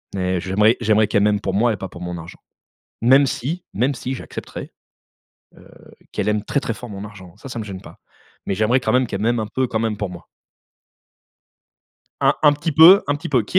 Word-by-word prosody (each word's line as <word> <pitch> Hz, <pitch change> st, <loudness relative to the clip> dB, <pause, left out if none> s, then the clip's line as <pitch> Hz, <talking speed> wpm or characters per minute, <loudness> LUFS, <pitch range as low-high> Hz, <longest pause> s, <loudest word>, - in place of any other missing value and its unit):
mais 90 Hz, -2 st, -1 dB
j'aimerais 105 Hz, +5 st, +3 dB
j'aimerais 110 Hz, 0 st, +3 dB
qu'elle 100 Hz, 0 st, +2 dB
m'aime 105 Hz, 0 st, +2 dB
pour 95 Hz, -3 st, -3 dB
moi 115 Hz, +5 st, +2 dB
et -, -, -5 dB
pas 95 Hz, -, -6 dB
pour 85 Hz, -, -12 dB
mon 90 Hz, 0 st, -5 dB
argent. 85 Hz, 0 st, -11 dB, 0.6 s
Même 135 Hz, +4 st, +5 dB
si, 155 Hz, +8 st, -4 dB
même 125 Hz, +7 st, +1 dB
si 130 Hz, +1 st, -4 dB
j'accepterais, -, -, -8 dB, 0.8 s
heu, -, -, -17 dB, 0.4 s
qu'elle -, -, -2 dB
aime 105 Hz, -1 st, 0 dB
très, 140 Hz, -, -1 dB
très 115 Hz, -, -3 dB
fort 125 Hz, -, -10 dB
mon 100 Hz, 0 st, -7 dB
argent, 95 Hz, -4 st, -12 dB
ça, 135 Hz, -, -10 dB
ça 120 Hz, -, -5 dB
me 110 Hz, -, -4 dB
gêne 95 Hz, -3 st, -8 dB
pas. -, -, -14 dB, 0.5 s
Mais 100 Hz, -, -1 dB
j'aimerais 110 Hz, +6 st, +2 dB
quand -, -, -1 dB
même, 125 Hz, 0 st, +3 dB
qu'elle 100 Hz, -3 st, -5 dB
m'aime 120 Hz, +1 st, +1 dB
un 110 Hz, -, -3 dB
peu, 130 Hz, 0 st, +1 dB
quand 110 Hz, -, -1 dB
même 110 Hz, -2 st, -1 dB
pour 105 Hz, -2 st, -2 dB
moi. 90 Hz, -, -11 dB, 1.9 s
Un -, -, +4 dB
un 150 Hz, -1 st, +6 dB
petit 145 Hz, +3 st, -3 dB
peu 165 Hz, +6 st, +8 dB
un 145 Hz, -, +1 dB
petit -, -, -7 dB
peu. 130 Hz, -5 st, +2 dB
Qu'il 145 Hz, -, +1 dB
110 Hz, 220 wpm, -20 LUFS, 100-130 Hz, 1.9 s, peu